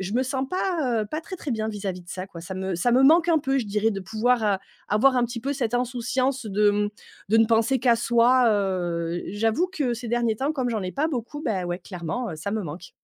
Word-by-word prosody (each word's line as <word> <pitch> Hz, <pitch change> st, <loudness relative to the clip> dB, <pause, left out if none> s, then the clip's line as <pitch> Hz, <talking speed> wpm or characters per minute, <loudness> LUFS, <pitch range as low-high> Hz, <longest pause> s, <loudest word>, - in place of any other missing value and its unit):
je 190 Hz, +2 st, -4 dB
me 255 Hz, -, +3 dB
sens 265 Hz, 0 st, -2 dB
pas, 325 Hz, -, 0 dB
heu, -, -, -5 dB
pas 310 Hz, -, -2 dB
très, 375 Hz, +3 st, -8 dB
très 305 Hz, -, -6 dB
bien 220 Hz, -2 st, -1 dB
vis-à-vis 195 Hz, -4 st, -4 dB
de 175 Hz, -, -21 dB
ça, 185 Hz, +1 st, -5 dB
quoi. 170 Hz, -4 st, -10 dB
Ça 185 Hz, +2 st, -7 dB
me 190 Hz, -1 st, -3 dB
ça 180 Hz, +8 st, +1 dB
me 260 Hz, +2 st, +5 dB
manque 330 Hz, +5 st, +6 dB
un 325 Hz, -2 st, +5 dB
peu 270 Hz, -1 st, 0 dB
je 230 Hz, -, -2 dB
dirais 210 Hz, +2 st, +1 dB
de 195 Hz, -, -4 dB
pouvoir 220 Hz, +5 st, +1 dB
a 200 Hz, -2 st, +1 dB, 0.3 s
avoir 255 Hz, +5 st, +4 dB
un 245 Hz, -, +3 dB
petit 235 Hz, 0 st, -5 dB
peu 275 Hz, +3 st, -2 dB
cette 245 Hz, -4 st, -2 dB
insouciance 250 Hz, +1 st, -1 dB
de, 205 Hz, +1 st, +3 dB
mmh, 205 Hz, 0 st, 0 dB, 0.4 s
de 225 Hz, -, +4 dB
ne 225 Hz, -, +6 dB
penser 230 Hz, +4 st, +2 dB
qu'à 240 Hz, -1 st, +3 dB
soi, 240 Hz, +1 st, +4 dB
heu, 175 Hz, -4 st, -1 dB
j'avoue 225 Hz, -, +1 dB
que 295 Hz, -10 st, -1 dB
ces 240 Hz, 0 st, -7 dB
derniers 235 Hz, -2 st, +1 dB
temps 275 Hz, +5 st, -1 dB
comme 255 Hz, -4 st, -1 dB
j'en 220 Hz, -3 st, -2 dB
ai 185 Hz, 0 st, -4 dB
pas 305 Hz, +3 st, 0 dB
beaucoup, 290 Hz, +2 st, -4 dB
bah, 195 Hz, -, -1 dB
ouais 175 Hz, 0 st, -3 dB
clairement, 185 Hz, +6 st, -5 dB
heu, 160 Hz, -, -6 dB
ça 165 Hz, +6 st, -4 dB
me 215 Hz, 0 st, -1 dB
manque. 170 Hz, +2 st, -8 dB
230 Hz, 260 wpm, -25 LUFS, 195-260 Hz, 0.4 s, manque